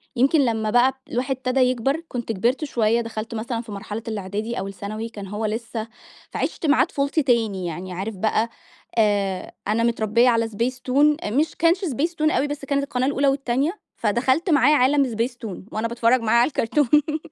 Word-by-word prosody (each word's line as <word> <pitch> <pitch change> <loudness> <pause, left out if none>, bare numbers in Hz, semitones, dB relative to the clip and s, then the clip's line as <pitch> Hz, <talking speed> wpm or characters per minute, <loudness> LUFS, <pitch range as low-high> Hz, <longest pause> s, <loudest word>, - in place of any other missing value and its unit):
يمكن 275 +5 +4
لمّا 220 -2 0
بقى 245 +3 +4 0.2
الواحد 260 +2 -1
ابتدا 255 +1 0
يكبر، 255 +5 +1
كنت 240 -2 -4
كبرت 240 +9 0
شوية، 230 -3 +1
دخلت 225 0 -5
مثلًا 230 +1 -3
في 225 -3 -11
مرحلة 210 +2 -6
الإعدادي 210 +2 -3
أو 195 - -4
الثانوي، 215 +3 -6
كان 205 -3 -8
هو 210 +3 -3
لسه 225 +1 -3 0.4
فعشت - - -3
معاه 300 +1 +5
طفولتي 280 +2 -1
تاني 220 -8 +1
يعني 180 +2 -5
عارف 200 +4 -4
بقى، 220 +3 0 0.5
آآ، 200 -3 +1 0.2
أنا 220 +2 +1
متربية 235 +1 +3
على 230 -1 +2
Spacetoon، 255 +6 +1
آآ، - - -2
مش 300 +5 +1
كانش 335 +3 +3
Spacetoon 310 +2 0
أوي، 290 - +1
بس 285 -1 -5
كانت 280 0 0
القناة 260 -1 -1
الأولى 280 0 +1
والتانية، 275 - 0 0.2
فدخلت 260 - +1
معاه 290 -1 +5
عالم 275 +2 +4
Spacetoon 230 -3 -3 0.2
وأنا 220 +2 -1
باتفرج 235 +1 +2
معاه 230 +1 +3
على 245 - +4
الكرتون. 300 +3 +1
235 Hz, 175 wpm, -23 LUFS, 220-275 Hz, 0.5 s, معاه